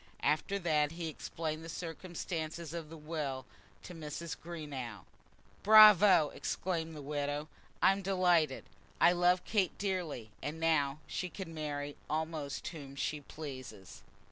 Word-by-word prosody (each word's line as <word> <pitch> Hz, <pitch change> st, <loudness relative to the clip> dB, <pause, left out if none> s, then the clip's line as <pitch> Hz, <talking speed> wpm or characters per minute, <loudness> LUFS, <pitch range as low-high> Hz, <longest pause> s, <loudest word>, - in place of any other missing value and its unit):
After 155 Hz, +6 st, +1 dB
that 155 Hz, -4 st, +1 dB
he 165 Hz, -1 st, -4 dB
explained 155 Hz, 0 st, -4 dB
the 165 Hz, -, -8 dB
circumstances 165 Hz, -1 st, -5 dB
of 165 Hz, -3 st, -5 dB
the 165 Hz, -, -9 dB
will 150 Hz, -4 st, -4 dB, 0.4 s
to 180 Hz, -, -8 dB
Mrs. 160 Hz, 0 st, -5 dB
Greenow. 140 Hz, -, -7 dB, 0.6 s
"Bravo," 205 Hz, -6 st, +8 dB
exclaimed 165 Hz, -3 st, -2 dB
the 150 Hz, -, -8 dB
widow. 145 Hz, +1 st, -2 dB, 0.4 s
"I'm 195 Hz, +2 st, +5 dB
delighted. 180 Hz, -6 st, +2 dB, 0.4 s
I 175 Hz, -, +7 dB
love 180 Hz, +1 st, +3 dB
Kate 200 Hz, -5 st, +1 dB
dearly: 175 Hz, -, -3 dB
and 150 Hz, +2 st, -4 dB
now 155 Hz, -3 st, +2 dB
she 180 Hz, -, -3 dB
can 180 Hz, -2 st, -7 dB
marry 145 Hz, -2 st, -4 dB
almost 155 Hz, -2 st, -3 dB
whom 140 Hz, -5 st, -9 dB
she 145 Hz, +2 st, -2 dB
pleases." 130 Hz, -10 st, -9 dB
160 Hz, 130 wpm, -33 LUFS, 145-175 Hz, 0.6 s, Bravo